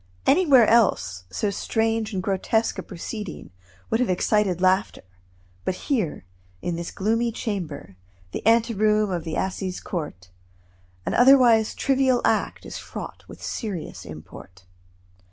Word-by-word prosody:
Anywhere 280 Hz, -7 st, +6 dB
else 185 Hz, -, +2 dB
so 200 Hz, -, -1 dB
strange 225 Hz, +1 st, -1 dB
and 190 Hz, -3 st, -3 dB
grotesque 200 Hz, +3 st, 0 dB
a -, -, -2 dB
proceeding 195 Hz, -, -7 dB, 0.4 s
would 225 Hz, -, +2 dB
have 250 Hz, -, +1 dB
excited 185 Hz, 0 st, +1 dB
laughter, 185 Hz, +2 st, +1 dB, 0.6 s
but 185 Hz, -, -1 dB
here, 200 Hz, -, -2 dB, 0.3 s
in 170 Hz, -, -3 dB
this 170 Hz, 0 st, -4 dB
gloomy 230 Hz, +4 st, 0 dB
chamber, 160 Hz, -, -5 dB, 0.3 s
the -, -, -5 dB
anteroom 215 Hz, -2 st, +3 dB
of 175 Hz, -2 st, -3 dB
the 160 Hz, -, -3 dB
assize 190 Hz, -1 st, -2 dB
court, 145 Hz, -, -6 dB, 0.7 s
an -, -, -1 dB
otherwise 245 Hz, -4 st, +6 dB
trivial 265 Hz, -2 st, +2 dB
act -, -, 0 dB
is -, -, -6 dB
fraught -, -, -8 dB
with -, -, -12 dB
serious 200 Hz, -8 st, -5 dB
import. 90 Hz, +4 st, -12 dB
210 Hz, 130 wpm, -24 LUFS, 175-225 Hz, 0.7 s, Anywhere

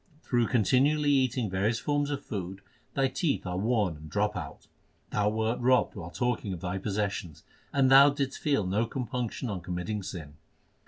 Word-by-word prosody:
Through 120 Hz, -2 st, +1 dB
continually 140 Hz, +6 st, +3 dB
eating 130 Hz, -4 st, +2 dB
various 100 Hz, +4 st, 0 dB
forms 145 Hz, +3 st, 0 dB
of 145 Hz, -1 st, -4 dB
food 95 Hz, -1 st, -5 dB, 0.3 s
thy 135 Hz, -2 st, +3 dB
teeth 135 Hz, -, -1 dB
are 90 Hz, -1 st, -3 dB
worn 105 Hz, -5 st, +1 dB
and 75 Hz, +1 st, -11 dB
drop 105 Hz, +3 st, 0 dB
out. 80 Hz, -7 st, -7 dB, 0.5 s
Thou 105 Hz, 0 st, +2 dB
wert 110 Hz, +2 st, -1 dB
robbed 125 Hz, +1 st, +3 dB
while 85 Hz, -, -7 dB
talking 120 Hz, -1 st, -1 dB
of 90 Hz, -, -6 dB
thy 90 Hz, +1 st, -3 dB
possessions, 100 Hz, -6 st, -3 dB, 0.3 s
and 135 Hz, -2 st, +3 dB
thou 140 Hz, +2 st, +9 dB
didst 140 Hz, -2 st, -2 dB
feel 140 Hz, -9 st, +1 dB
no 105 Hz, +5 st, 0 dB
compunction 125 Hz, 0 st, -3 dB
on 100 Hz, -5 st, -4 dB
committing 90 Hz, +5 st, -3 dB
sin. 75 Hz, -6 st, -8 dB
110 Hz, 170 wpm, -29 LUFS, 95-130 Hz, 0.5 s, thou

